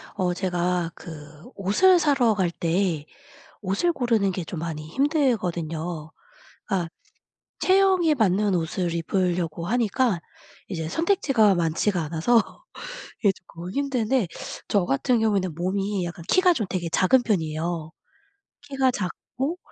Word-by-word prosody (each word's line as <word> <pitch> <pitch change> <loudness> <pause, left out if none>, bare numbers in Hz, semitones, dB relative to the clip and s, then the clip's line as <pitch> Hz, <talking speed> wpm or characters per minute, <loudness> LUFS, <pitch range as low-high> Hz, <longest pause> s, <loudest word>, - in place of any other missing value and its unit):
어 180 -3 0
제가 180 -2 -1
그 150 -1 -11
옷을 345 - +4
사러 275 -8 +3
갈 190 -4 0
때 170 -2 0 0.6
옷을 200 - +1
고르는 230 -8 +1
게 180 -1 -4
좀 165 0 -6
많이 155 -2 -5
힘들거든요. 175 - -1 0.6
아 185 -5 0 0.7
체형에 375 -4 +4
맞는 205 -4 +2
옷을 170 +1 -1
입으려고 170 -1 -1
하니까 230 -2 +1 0.5
이제 165 -5 -4
선택지가 270 - +3
많지가 170 +3 +1
않아서 165 +10 +3 0.8
이게 205 - +4
조금 175 -1 -10
힘든데 260 -4 0 0.4
저 200 -4 +2
같은 175 - +1
경우에는 200 -6 +1
몸이 195 +2 -1
약간 170 0 -7
키가 370 -1 +5
좀 220 - -2
되게 175 -2 -2
작은 215 +10 +3
편이에요. 160 -4 -1 0.7
키가 270 -2 +1
작고 255 - -4
190 Hz, 255 characters per minute, -25 LUFS, 170-245 Hz, 0.8 s, 키가